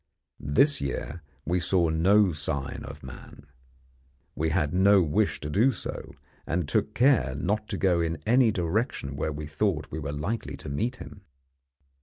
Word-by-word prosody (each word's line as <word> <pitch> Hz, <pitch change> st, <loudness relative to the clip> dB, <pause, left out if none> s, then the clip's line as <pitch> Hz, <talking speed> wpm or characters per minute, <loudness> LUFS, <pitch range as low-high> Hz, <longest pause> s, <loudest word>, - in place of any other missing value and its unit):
This 140 Hz, -, +3 dB
year 70 Hz, +4 st, -4 dB, 0.2 s
we 90 Hz, +3 st, +1 dB
saw 90 Hz, -1 st, +2 dB
no 95 Hz, +5 st, +4 dB
sign 70 Hz, -3 st, -4 dB
of 70 Hz, +2 st, -10 dB
man. 65 Hz, +2 st, -11 dB, 0.9 s
We 80 Hz, +1 st, -1 dB
had 80 Hz, -2 st, 0 dB
no 95 Hz, +1 st, +5 dB
wish 75 Hz, -3 st, 0 dB
to -, -, -4 dB
do 115 Hz, -, +4 dB
so, 105 Hz, -, -6 dB, 0.3 s
and 85 Hz, -2 st, -1 dB
took 70 Hz, -, 0 dB
care 120 Hz, -, +3 dB
not 105 Hz, +10 st, -1 dB
to -, -, -3 dB
go 90 Hz, -3 st, +2 dB
in 80 Hz, -1 st, -1 dB
any 120 Hz, +1 st, +4 dB
direction 90 Hz, -, -2 dB
where 75 Hz, +2 st, -2 dB
we 75 Hz, +1 st, -6 dB
thought 75 Hz, 0 st, -1 dB
we 80 Hz, -, -4 dB
were 70 Hz, -1 st, -4 dB
likely 80 Hz, +11 st, -4 dB
to -, -, -8 dB
meet 115 Hz, -, -1 dB
him. 100 Hz, -, -11 dB
85 Hz, 165 wpm, -27 LUFS, 75-105 Hz, 0.9 s, no